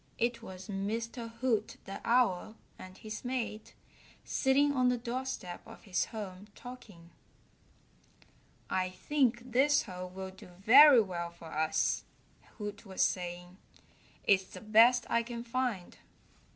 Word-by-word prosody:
It 235 Hz, 0 st, 0 dB
was 190 Hz, -4 st, -10 dB
Mr. 230 Hz, +4 st, -3 dB
Hoot 225 Hz, -5 st, 0 dB
the 195 Hz, +1 st, -7 dB
Owl 225 Hz, -3 st, +2 dB, 0.2 s
and 185 Hz, 0 st, -11 dB
his 215 Hz, -1 st, -7 dB
mate 240 Hz, -4 st, -4 dB, 0.5 s
sitting 285 Hz, +2 st, +2 dB
on 255 Hz, -2 st, +3 dB
the 250 Hz, -, +1 dB
doorstep 240 Hz, -6 st, -5 dB
of 225 Hz, -, -14 dB
his 190 Hz, -4 st, 0 dB
home 205 Hz, -3 st, -8 dB
talking. 210 Hz, -9 st, -12 dB, 1.6 s
"I 185 Hz, 0 st, 0 dB
think 245 Hz, +4 st, 0 dB
this 280 Hz, +4 st, +4 dB
hole 185 Hz, -3 st, -7 dB
will 190 Hz, +1 st, -7 dB
do 190 Hz, -, -14 dB
very 260 Hz, +5 st, +9 dB
well 175 Hz, -4 st, -4 dB
for 170 Hz, -1 st, -12 dB
us," 155 Hz, +1 st, +1 dB, 0.5 s
Hoot 205 Hz, -1 st, -6 dB
was 190 Hz, -3 st, 0 dB
saying. 180 Hz, 0 st, -3 dB, 0.7 s
"It's 190 Hz, -1 st, +3 dB
the -, -, -11 dB
best 230 Hz, +3 st, +5 dB
I 235 Hz, -, +2 dB
can 235 Hz, 0 st, -6 dB
find." 240 Hz, -6 st, -3 dB
215 Hz, 130 wpm, -32 LUFS, 185-245 Hz, 1.6 s, very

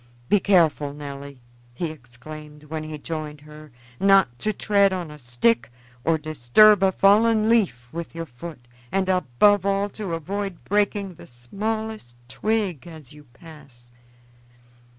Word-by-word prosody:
"Be 205 Hz, -, +5 dB
careful, 160 Hz, -7 st, +2 dB
Nelly," 140 Hz, -2 st, -9 dB, 0.3 s
he 165 Hz, +3 st, -3 dB
exclaimed 150 Hz, +3 st, -12 dB
when 155 Hz, +1 st, -5 dB
he 155 Hz, 0 st, -6 dB
joined 150 Hz, -1 st, -6 dB
her, 150 Hz, +1 st, -13 dB, 0.3 s
"not 195 Hz, -12 st, +4 dB
to 215 Hz, -, 0 dB
tread 200 Hz, -1 st, +2 dB
on 180 Hz, -4 st, -4 dB
a 150 Hz, -, -12 dB
stick 120 Hz, -2 st, +1 dB, 0.3 s
or 165 Hz, 0 st, +2 dB
disturb 155 Hz, -, +4 dB
a 190 Hz, -1 st, +4 dB
fallen 215 Hz, +3 st, +4 dB
leaf 200 Hz, -, +1 dB
with 170 Hz, 0 st, -7 dB
your 165 Hz, 0 st, -4 dB
feet, 125 Hz, -1 st, -11 dB, 0.2 s
and 195 Hz, -1 st, 0 dB
above 185 Hz, +3 st, +3 dB
all 200 Hz, +1 st, 0 dB
to 195 Hz, -4 st, -4 dB
avoid 195 Hz, +3 st, -5 dB
breaking 205 Hz, -1 st, 0 dB
the -, -, -14 dB
smallest 205 Hz, -, -5 dB
twig 200 Hz, -, -2 dB
as 155 Hz, -4 st, -12 dB
you 150 Hz, 0 st, -15 dB
pass. 130 Hz, -3 st, -16 dB
160 Hz, 140 wpm, -23 LUFS, 140-195 Hz, 0.3 s, Be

